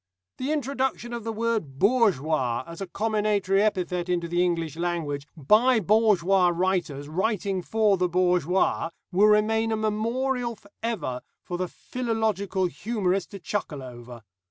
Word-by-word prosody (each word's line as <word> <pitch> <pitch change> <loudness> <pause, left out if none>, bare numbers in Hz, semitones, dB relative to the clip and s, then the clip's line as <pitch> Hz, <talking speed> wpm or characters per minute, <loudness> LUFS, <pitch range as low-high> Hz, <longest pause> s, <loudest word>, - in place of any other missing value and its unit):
The 265 +4 -2
introduction 265 -4 -2
of 235 -2 -4
the 225 - -3
word 220 -11 -2
'bourgeois' 155 - +2
as 170 +2 -9
a 195 - -3
comminatory 205 -1 +1
epithet 180 -4 0
into 175 -1 0
the 175 +1 +1
English 165 -4 -1
language, 160 -4 -2
by 220 - +4
bourgeois 195 -3 +3
writers 175 -5 -1
writing 190 +3 -1
for 210 +1 +2
the 180 0 +1
bourgeois, 180 -1 +1 0.2
will 195 +4 +5
remain 220 +1 +3
a 220 - +1
memorial 235 +3 -1
for 205 -1 -21
ever, 170 - -3 0.2
for 175 -1 -5
the 185 - -1
philological 220 -5 -2
humourist 190 - -1
to 200 - -8
chuckle 165 -6 -4
over. 120 -2 -10
195 Hz, 140 wpm, -26 LUFS, 170-220 Hz, 0.2 s, will